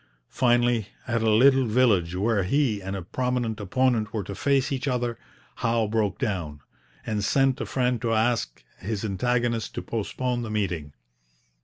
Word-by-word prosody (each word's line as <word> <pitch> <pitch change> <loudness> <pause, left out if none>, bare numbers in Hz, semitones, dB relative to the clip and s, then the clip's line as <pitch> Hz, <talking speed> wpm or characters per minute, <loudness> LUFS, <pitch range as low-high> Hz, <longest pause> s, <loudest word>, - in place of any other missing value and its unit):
Finally, 120 -3 +2 0.2
at 115 -1 0
a 110 - +2
little 130 +4 +5
village 105 -7 +2
where 105 +2 +1
he 110 +1 +1
and 95 +1 -4
a 95 - -5
prominent 120 +2 -2
opponent 115 +1 +1
were 110 -3 -2
to 100 - -6
face 135 +4 +1
each 135 0 -2
other, 120 -3 -1 0.4
Howe 115 -1 +1
broke 105 -3 0
down, 80 -8 -3 0.4
and 105 -2 -2
sent 135 +4 +2
a - - -3
friend 125 -3 0
to 115 - -1
ask 115 - 0 0.2
his 105 +1 -3
antagonist 115 +2 -1
to - - -4
postpone 120 +2 -2
the 115 - -5
meeting. 90 -9 -2
115 Hz, 160 wpm, -25 LUFS, 100-125 Hz, 0.4 s, little